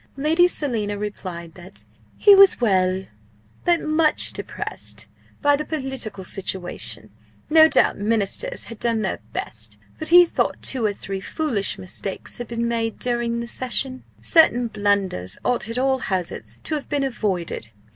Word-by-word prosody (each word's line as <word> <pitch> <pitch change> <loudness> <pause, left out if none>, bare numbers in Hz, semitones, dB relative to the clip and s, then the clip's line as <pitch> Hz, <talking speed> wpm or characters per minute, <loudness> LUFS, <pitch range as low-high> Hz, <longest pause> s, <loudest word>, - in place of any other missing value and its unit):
Lady 320 +5 +4
Selina 225 -11 -2
replied 185 -5 -6
that 180 +2 -7 0.3
he 410 - +7
was 390 -1 +7
well, 190 -4 +2 0.6
but 345 -1 +4
much 310 0 +2
depressed - - -6 0.4
by 290 0 +5
the 300 - -3
political 265 -9 -4
situation. 175 - -4 0.4
No 315 0 +8
doubt - - +2
Ministers 225 - -1
had 230 -2 -10
done 230 -2 0
their - - -2
best, - - -6 0.2
but 315 - -4
he 350 +1 +9
thought - - -1
two 255 -4 +1
or 205 - +1
three 195 -1 -6
foolish 235 -7 -1
mistakes 185 +4 -6
had 240 - -5
been 235 0 -2
made 230 -1 -1
during 235 -1 -1
the 235 - -5
session. 255 +1 -1 0.2
Certain 315 -8 +4
blunders 195 - 0
ought 240 -3 0
at 230 - -4
all 265 +1 +2
hazards 170 - -3
to - - -4
have 295 -2 -3
been 290 -1 0
avoided. 190 - -2
235 Hz, 150 wpm, -23 LUFS, 195-285 Hz, 0.6 s, he